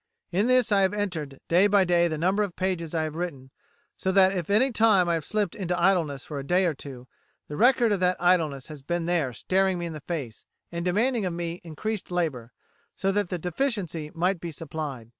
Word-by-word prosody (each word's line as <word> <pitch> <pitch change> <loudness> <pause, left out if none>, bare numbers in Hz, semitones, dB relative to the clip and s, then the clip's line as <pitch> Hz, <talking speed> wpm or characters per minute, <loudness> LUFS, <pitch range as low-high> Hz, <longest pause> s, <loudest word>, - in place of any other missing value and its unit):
In 195 +6 +1
this 255 -3 +3
I 200 -1 +4
have 190 +2 +2
entered 160 -10 -3
day 180 +4 +5
by 200 -1 +4
day 175 -1 +3
the 160 -2 -3
number 185 +6 +1
of 200 -4 -2
pages 180 -3 -2
I 160 - +1
have 155 -1 -4
written, 150 -6 -5 0.4
so 190 - -1
that 190 0 +5
if 175 -2 -3
at 200 - +3
any 265 +2 +2
time 215 -6 +4
I 170 - +2
have 165 -2 -1
slipped 205 +1 -1
into 180 -3 -2
idleness 170 -7 +1
for 145 -2 -5
a - - -5
day 180 +6 +2
or 170 - +1
two, 130 -3 -10 0.4
the 150 - -6
record 240 - +4
of 200 - +1
that 180 0 +2
idleness 165 -7 +2
has 150 -2 -9
been 175 +4 -2
there 165 -7 0
staring 190 - +1
me 175 - -3
in 165 - -5
the 155 - -8
face, 140 -10 -6 0.2
and 170 0 -4
demanding 220 +6 +1
of 175 - -3
me 170 0 -4
increased 185 +6 -4
labour, 155 -10 -2 0.4
so 195 0 0
that 205 -2 0
the 180 - -2
deficiency 175 - -2
might 180 +2 +1
be 170 - -5
supplied. 150 -7 -6
175 Hz, 225 wpm, -26 LUFS, 155-195 Hz, 0.4 s, day